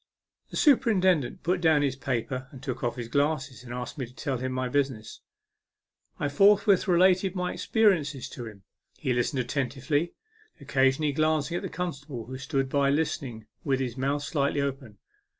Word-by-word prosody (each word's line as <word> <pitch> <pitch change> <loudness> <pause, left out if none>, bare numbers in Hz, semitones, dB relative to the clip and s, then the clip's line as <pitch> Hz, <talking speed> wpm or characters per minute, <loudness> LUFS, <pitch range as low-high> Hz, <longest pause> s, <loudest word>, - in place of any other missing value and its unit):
The - - -5
superintendent 190 - +3
put 180 +1 0
down 160 -3 +4
his 135 -2 0
paper 130 0 -3
and 135 0 -13
took 130 -3 -4
off 120 - 0
his 120 -2 -5
glasses, 140 -1 -1
and 120 - -10
asked 125 +4 -5
me 130 - -3
to 125 - -18
tell 130 -3 -2
him 130 +1 -3
my 130 0 -1
business. 130 -5 -2 1.0
I 145 - 0
forthwith 200 +6 +4
related 185 +1 +4
my 180 -1 -1
experi 215 -5 +3
ences 140 -3 -6
to 120 -2 -7
him. 100 -3 -12 0.3
He 130 - -1
listened 125 +2 0
attentively, 140 +5 -1 0.4
occa 135 0 +2
sionally 145 +2 +1
glancing 155 +2 +1
at - - -4
the - - -4
constable, 145 -9 -5
who 130 +3 -7
stood 135 -1 -1
by 140 0 +2
listening 140 -6 -1 0.2
with 135 -3 +1
his 125 -3 -2
mouth 140 +2 -1
slightly 145 -1 0
open. 135 -6 -3
140 Hz, 175 wpm, -27 LUFS, 130-160 Hz, 1.0 s, down